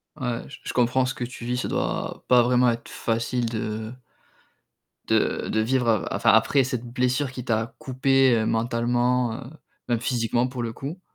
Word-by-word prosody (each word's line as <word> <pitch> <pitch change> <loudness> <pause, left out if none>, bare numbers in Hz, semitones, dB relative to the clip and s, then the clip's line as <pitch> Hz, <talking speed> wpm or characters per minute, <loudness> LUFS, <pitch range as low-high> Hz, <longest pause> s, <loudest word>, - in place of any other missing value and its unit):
Ouais, 125 -5 -3
j - - -10
je - - -5
comprends 125 +1 +2
ce 130 - -2
que 125 - -5
tu 120 -1 -7
vis, 125 +1 -1
ça - - -2
doit - - -3
pas 125 -1 +6
vraiment 125 0 +3
être 115 0 -3
facile 115 +1 -1
de 110 0 -4 1.1
de - - +1
de 110 - 0
vivre 125 +1 +1
a 110 -3 0
enfin, - - +4
après 115 +5 +4
cette 125 -2 -3
blessure 125 +2 0
qui 125 -2 -7
t'a 115 -1 -1
coupé, 130 -1 +3
heu, 110 -1 +1
mentalement, 120 +1 +1
heu, 125 - -10 0.4
même 120 -2 +1
physiquement 120 0 0
pour 125 -1 -5
le 115 - -3
coup, 150 +10 -6
120 Hz, 185 wpm, -25 LUFS, 115-125 Hz, 1.1 s, pas